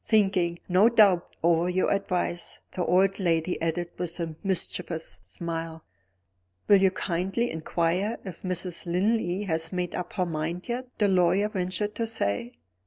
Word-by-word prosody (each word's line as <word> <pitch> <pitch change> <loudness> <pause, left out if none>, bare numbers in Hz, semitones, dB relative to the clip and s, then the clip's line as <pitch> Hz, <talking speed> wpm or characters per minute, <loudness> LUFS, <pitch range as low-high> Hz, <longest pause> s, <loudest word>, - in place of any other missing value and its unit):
Thinking, 190 -6 +2
no 190 +5 +5
doubt, 200 -7 +4
over 170 +1 +3
your 185 +1 +1
advice," 180 -3 -1
the 180 - -2
old 190 +3 +3
lady 170 -1 0
added 170 +1 -1
with 180 0 -3
a 165 -2 -3
mischievous 170 - -2
smile. 165 - -6 0.8
"Will 205 - +7
you 190 - +6
kindly 190 +6 -1
inquire 170 +6 -1
if 180 -4 -8
Mrs. 180 -1 -2
Linley 190 +1 +1
has 165 -4 +1
made 180 -1 -2
up 180 -1 -4
her 185 -3 0
mind 165 +2 -3
yet?" 250 +1 -3
the 205 - +3
lawyer 190 +2 +3
ventured 200 +2 -2
to 230 - -2
say. 115 - -2
180 Hz, 150 wpm, -27 LUFS, 165-195 Hz, 0.8 s, Will